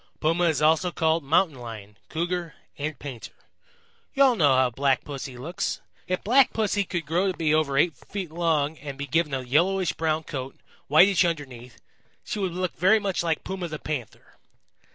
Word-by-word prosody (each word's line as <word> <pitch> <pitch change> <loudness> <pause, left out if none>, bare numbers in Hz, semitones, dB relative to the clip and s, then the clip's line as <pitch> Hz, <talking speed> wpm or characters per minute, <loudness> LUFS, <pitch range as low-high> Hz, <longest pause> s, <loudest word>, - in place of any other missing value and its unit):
Puma 165 +3 +2
is 155 -3 +1
also 160 +3 +3
called 160 -1 +1
Mountain 155 0 +2
Lion, 110 -4 -9
Cougar 170 0 -3 0.2
and 150 +1 -4
Painter. 130 -6 -9 0.8
You 275 - +5
all 260 -3 +5
know 145 -9 +4
how 130 -1 +3
Black 135 +1 +1
Pussy 135 -3 -7
looks. 160 +9 -3 0.3
If 185 0 -2
Black 255 +4 +4
Pussy 205 -2 +1
could 175 -3 -3
grow 180 +6 +1
to - - -10
be 155 -2 +1
over 150 -3 +1
eight 165 +3 +3
feet 185 +4 -7
long 160 -3 0
and 140 -1 -7
be 140 - -4
given 150 +2 0
a 135 -1 -1
yellowish 175 +9 +2
brown 160 0 -1
coat, 135 -4 -6 0.3
whitish 180 +7 +5
underneath, 130 -8 -4 0.4
she 210 - -4
would 190 -3 -1
look 185 0 -3
very 190 +6 +4
much 200 -3 -1
like 165 -2 -1
Puma 185 -2 -4
the 155 -1 -5
Panther. 145 -7 -7
160 Hz, 180 wpm, -25 LUFS, 140-180 Hz, 0.8 s, You